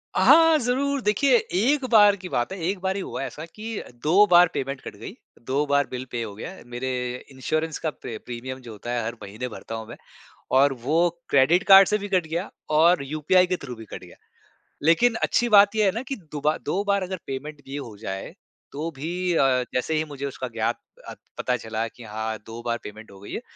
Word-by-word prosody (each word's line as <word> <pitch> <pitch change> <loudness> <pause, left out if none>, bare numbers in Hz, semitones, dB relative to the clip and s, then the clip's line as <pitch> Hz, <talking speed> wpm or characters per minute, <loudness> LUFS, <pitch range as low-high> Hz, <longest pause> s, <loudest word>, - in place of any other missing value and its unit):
हाँ 325 -1 +6
ज़रूर 270 +3 0
देखिए 245 +5 +3 0.2
एक 260 +8 +2
बार 205 -3 +7
की 185 -2 -9
बात 120 +8 -1
है - - -6
एक 190 +1 -1
बार 190 0 -1
ही 200 - -2
हुआ - - -5
ऐसा 150 +5 -6
कि 220 0 -5 0.2
2 185 +7 +6
बार 175 +1 +8
पेमेंट 135 0 -3
कट - - -9
गई - - -8 0.4
2 140 +3 +1
बार 140 -1 +2
बिल 130 0 -5
पे 120 - -3
हो 105 -2 -7
गया 115 - -7
मेरे 120 +2 -4 0.4
इंश्योरेंस 155 +4 -2
का 160 - -1
प्रे 115 -6 -8
प्रीमियम 130 +2 -6
जो - - -7
होता 110 +3 -7
है 120 -2 -1
हर 115 +1 -4
महीने 105 +5 -6
भरता 115 - -7
हूँ 110 -1 -7
मैं 120 - -9 0.6
और 140 +1 +5
वो 155 +3 +2 0.3
क्रेडिट 160 +8 +4
कार्ड 195 -1 +9
से 210 - +1
भी 205 0 -6
कट 175 -3 +2
गया 170 +4 -3 0.3
और 170 -1 +5
यूपीआई 155 +6 +2
के 180 0 -1
थ्रू 125 -2 -6
भी 110 - -10
कट - - -9
गया। - - -15 0.7
लेकिन 225 +9 +4
अच्छी 240 0 +1
बात 205 0 +6
ये 215 -1 +3
है 195 - +4
ना 235 - -2
कि 275 - -2 0.2
दुबा 150 +1 0
2 200 - 0
बार 200 -1 +2
अगर 185 0 -4
पेमेंट 145 +2 -6
भी 135 - -7
हो 120 -7 -7
जाए, 95 -3 -6 0.4
तो 155 +4 -4
भी 175 +5 -2
अ, 130 -5 +3
जैसे 125 +5 -1
ही 155 - +1
मुझे 140 -2 -6
उसका 130 -2 -5
ज्ञात 115 0 -2 0.3
अत - - -9 0.2
पता 125 - 0
चला 110 0 -3
कि 120 +1 -14
हाँ 110 0 -4
2 115 +1 -8
बार 115 0 0
पेमेंट 105 0 -10
हो 95 - -14
गई 100 - -11
है, - - -3
150 Hz, 220 wpm, -24 LUFS, 120-190 Hz, 0.7 s, कार्ड